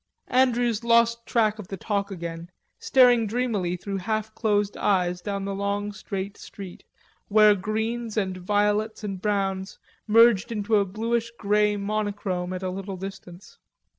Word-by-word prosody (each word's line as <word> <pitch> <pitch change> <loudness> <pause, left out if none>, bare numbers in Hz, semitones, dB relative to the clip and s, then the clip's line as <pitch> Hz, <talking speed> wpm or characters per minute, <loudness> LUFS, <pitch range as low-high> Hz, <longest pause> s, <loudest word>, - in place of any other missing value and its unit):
Andrews 245 -3 +2
lost 235 0 +3
track 215 -2 +1
of 200 - -8
the 195 - -6
talk 200 0 -2
again, 170 -2 -6 0.3
staring 245 -4 +5
dreamily 210 -6 -1
through 195 +2 -4
half 215 +2 -2
closed 205 -2 0
eyes 180 -3 +1
down 200 0 -3
the 200 - -3
long 200 +1 -2
straight 200 -1 -5
street, 190 -3 -10 0.4
where 210 0 +6
greens 220 +3 -3
and 190 -3 0
violets 210 +4 0
and 195 -3 -4
browns 195 -2 -1 0.3
merged 230 -1 +5
into 215 0 +1
a 200 - +2
bluish 230 +4 -2
grey 210 0 +2
monochrome 200 -3 -2
at 185 0 -5
a 185 - -2
little 195 0 -6
distance. 190 -1 -10
205 Hz, 145 wpm, -25 LUFS, 195-220 Hz, 0.4 s, where